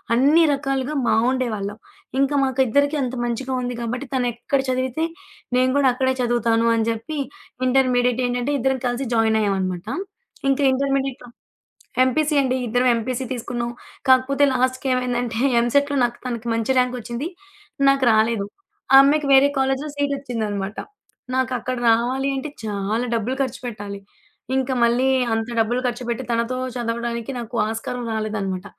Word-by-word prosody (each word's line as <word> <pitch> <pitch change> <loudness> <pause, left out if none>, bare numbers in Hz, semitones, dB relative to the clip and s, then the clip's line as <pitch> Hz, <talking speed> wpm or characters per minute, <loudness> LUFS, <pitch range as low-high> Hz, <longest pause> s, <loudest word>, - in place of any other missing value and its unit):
అన్ని 295 +7 +5
రకాలుగా 275 +1 -2
బావుండేవాళ్ళం. 225 -4 0 0.4
ఇంకా 275 +1 +2
మాకు 265 0 -1
ఇద్దరికి 285 +5 +2
అంత 255 -1 -2
మంచిగా 255 +3 -3
ఉంది 245 0 -3
కాబట్టి, 250 +4 -4
తనెక్కడ 245 +2 0
చదివితే 260 +5 0 0.5
నేను 255 0 +3
గూడా 270 -2 +4
అక్కడే 260 +1 +1
చదువుతాను 235 -1 +2
అని 225 -1 +1
జెప్పి 230 +7 -5 0.5
ఇంటర్మీడియేట్ 250 -1 +2
ఏంటంటే 245 +3 -1
ఇద్దరం 265 +1 +1
కలిసి 245 +1 -2
జాయినయ్యామనమాట. 200 -4 +1 0.6
ఇంకా 280 +1 +1
ఇంటర్మీడియట్‌లో 270 -2 -1 0.8
ఎంపీసీ 300 +4 +1
అండి. 260 -1 0
ఇద్దరం 245 +3 +2
ఎంపీసీ 250 +3 -3
తీసుకున్నాం. 240 0 -3 0.4
కాకపోతే 260 +2 +4
లాస్ట్‌‌కి 255 +1 0
ఏమైందంటే 245 -2 -1 0.2
ఎంసెట్‌లో 285 +4 +2
నాకు 240 0 -4
తనకి 235 -1 -4
మంచి 230 +3 0
ర్యాంకొచ్చింది. 250 +2 -2 0.6
నాకు 275 -1 +2
రాలేదు. 220 -1 +2 0.5
ఆ - - +10
అమ్మాయికి 290 +1 +2
వేరే 270 +1 +7
కాలేజిలో 270 +2 0
సీటొచ్చిందనమాట. 230 -8 -2 0.6
నాకక్కడ 255 -1 -1
రావాలి 250 +4 +2
అంటే 270 +3 -4
చాలా 210 +3 -2
డబ్బులు 230 +3 -1
ఖర్చుపెట్టాలి. 220 -6 -5 0.6
ఇంక 265 0 0
మళ్ళీ 240 +3 +3 0.3
అంత 225 +1 -1
డబ్బులు 235 +3 +1
ఖర్చుపెట్టి 240 +1 -3
తనతో 235 +2 0 0.2
చదవడానికి 235 0 -3
నాకు 235 +1 -7
ఆస్కారం 230 +2 -4
రాలేదనమాట. 205 -3 -3
245 Hz, 125 wpm, -22 LUFS, 230-265 Hz, 0.8 s, ఆ